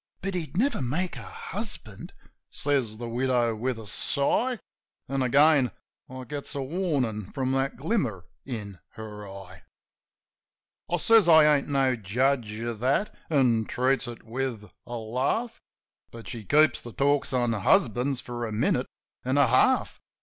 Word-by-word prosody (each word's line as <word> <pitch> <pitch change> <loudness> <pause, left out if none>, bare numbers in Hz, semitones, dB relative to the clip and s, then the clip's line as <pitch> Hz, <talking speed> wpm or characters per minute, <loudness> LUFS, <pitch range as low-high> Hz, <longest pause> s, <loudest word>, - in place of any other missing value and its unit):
"But 195 0 -2
he'd 170 -1 -4
never 265 - +1
make 160 +9 -2
a - - -7
husband 200 - -7 0.2
!" - - -52
says 135 -7 -1
the 120 +1 -5
widow, 120 -1 +1
with 125 +2 -2
a 110 - -9
sigh, 145 - +1 0.5
An' 135 0 -1
again 140 +1 +4 0.4
I 130 0 -7
gets 140 +4 -6
a - - -2
warnin' 130 - -2
from 130 -1 -1
that 135 +1 0
glimmer 135 - -1 0.2
in 105 -8 -6
her 105 -2 -8
eye. - - -10
RED 95 -1 -11 1.3
ROBIN - - -5
67 - - +5
I - - 0
says 220 0 +5
I 155 -2 +7
ain't 140 - -2
no 135 -2 +2
judge 120 +2 0
of 115 -2 -4
that; 135 - 0
an' 125 -7 +3
treats 130 +3 0
it 120 -1 -8
with 115 -4 -4 0.2
a 120 - -5
laugh. 130 - -2 0.5
But 115 -1 -11
she 115 -4 -7
keeps 150 +7 +4
the 120 - -10
talk 140 0 +1
on 120 -2 +1
husbands 125 - +2
for 120 -1 -5
a - - -6
minute 105 +2 +1 0.4
an' 130 +2 0
a 140 - +6
half. 120 - +2
130 Hz, 165 wpm, -27 LUFS, 115-145 Hz, 1.3 s, I